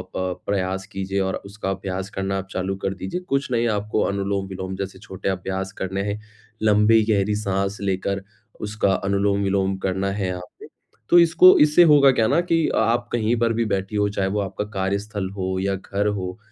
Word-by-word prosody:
प 90 -1 -3
प्रयास 95 -1 -1
कीजिए 95 0 -2
और 95 0 -1
उसका 100 0 -5
अभ्यास 95 0 -4
करना 95 -1 -2
आप 95 - -5
चालू 95 +1 -2
कर 95 - 0
दीजिए। 95 - -4
कुछ 140 -1 -1
नहीं, 120 -1 +2
आपको 105 0 -1
अनुलोम-विलोम 95 -1 -2
जैसे 95 -1 -6
छोटे 95 -1 -5
अभ्यास 95 0 -3
करने 95 +1 -2
हैं। 105 - -4 0.4
लंबी 105 +1 +5
गहरी 105 0 +1
साँस 100 -1 -1
लेकर 100 0 -1 0.4
उसका 105 -2 0
अनुलोम-विलोम 100 -1 0
करना 95 +1 0
है 100 -1 -2
यहाँ 90 -1 -4 0.2
पे। - - -11 0.4
तो 175 - +7
इसको 170 +2 +7
इससे 150 +3 +6
होगा 140 -2 +7
क्या 115 -3 +2
ना? - - +3
कि 165 -2 +1
अ - - -1
आप 120 +1 +1
कहीं 115 0 +1
पर 115 0 +2
भी 115 +1 0
बैठीं 95 0 -2
हों, 105 0 +2
चाहे 100 -2 -1
वो 105 +2 -1
आपका 100 +1 -4
कार्यस्थल 100 +1 -2
हो 95 -1 -2
या 100 0 0
घर 100 +2 -2
हो, 95 -2 -3
100 Hz, 190 wpm, -23 LUFS, 95-105 Hz, 0.4 s, तो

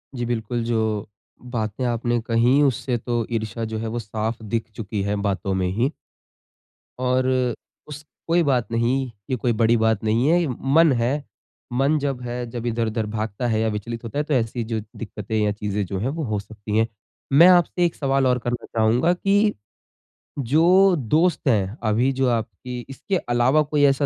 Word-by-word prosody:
जी 120 -1 -2
बिल्कुल, 120 0 -2
जो 110 -3 -1 0.4
बातें 110 0 -2
आपने 120 0 0
कहीं 120 +5 +4
उससे 130 -2 0
तो 120 0 -2
ईर्षा 110 0 -3
जो - - -1
है 115 - -3
वो 120 - -1
साफ़ 110 +1 -4
दिख 110 +1 -3
चुकी 105 -2 -4
है 100 +1 -1
बातों 95 0 -2
में 90 - +1
ही। 115 +9 0 1.1
और 130 0 +1 0.6
उस 150 0 -8 0.2
कोई 170 +1 +3
बात 125 -5 0
नहीं, 120 +2 0 0.2
ये 130 - +1
कोई 120 0 0
बड़ी 115 +1 +3
बात 110 -2 +1
नहीं 115 +4 +2
है, 170 +3 +4
ये 170 - 0
मन 140 +6 +3
है। 140 +5 0 0.5
मन 140 +5 +2
जब 140 -3 -2
है 125 0 -4
जब 120 0 -6
इधर-उधर 115 -1 -1
भागता 110 +2 -2
है 110 -2 +1
या 110 - +1
विचलित 115 +3 -5
होता 115 +4 -6
है 150 - +1
तो 150 - -2
ऐसी 115 -1 0
जो 110 0 -2 0.2
दिक्कतें 105 -1 -6
या 105 -1 +2
चीज़ें 105 -1 -2
जो 95 +1 -4
है 120 - -1
वो 160 - -2
हो 110 -4 -1
सकती 105 +1 -5
है। 115 0 +3 0.5
मैं 165 +6 +8
आपसे 175 0 +4
एक 170 - -1
सवाल 135 -1 +1
और 125 0 +2
करना 120 0 -3
चाहूँगा 115 +9 +2
कि, 200 +3 +2 0.9
जो 175 +9 +4
दोस्त 155 +5 +1
है 105 -3 +1
अभी 115 +5 +2
जो 135 0 +1
आपकी 115 +2 -3
इसके 180 +8 -2 0.2
अलावा 130 +6 +4
कोई 150 0 0
ऐसा 140 +1 +3
120 Hz, 185 wpm, -23 LUFS, 110-135 Hz, 1.1 s, मैं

